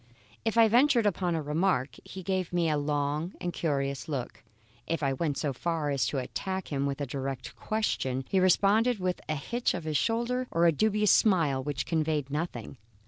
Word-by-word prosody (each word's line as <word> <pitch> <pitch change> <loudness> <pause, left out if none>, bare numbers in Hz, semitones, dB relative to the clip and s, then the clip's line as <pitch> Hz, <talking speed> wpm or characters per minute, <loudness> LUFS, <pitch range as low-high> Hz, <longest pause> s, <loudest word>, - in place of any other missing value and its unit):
If 225 0 -1
I 225 -1 +7
ventured 240 0 +4
upon 180 -3 +1
a 160 - -2
remark, 150 -2 0
he 190 - -9
gave 185 -1 -1
me 170 -2 +1
a - - +2
long 145 +3 -1
and 175 -1 -3
curious 140 -3 -2
look; 135 -5 -4 0.5
if 165 -2 -2
I 135 -1 +2
went 145 +1 -1
so 145 -3 -1
far 160 +1 -1
as 140 -2 +1
to 145 - -2
attack 190 +8 -4
him 140 -1 -1
with 140 0 -3
a - - 0
direct 135 -1 -5
question, 135 -12 -1
he 190 - +2
responded 205 +6 +4
with 180 -1 -2
a 155 - +1
hitch 235 - -1
of 175 - -5
the 155 -1 -3
shoulder 235 - 0
or 170 +1 +2
a 170 - +6
dubious 210 +4 +2
smile 165 -10 +3
which 135 -1 -3
conveyed 155 -3 -1
nothing. 145 -5 -4
165 Hz, 195 wpm, -29 LUFS, 140-190 Hz, 0.5 s, I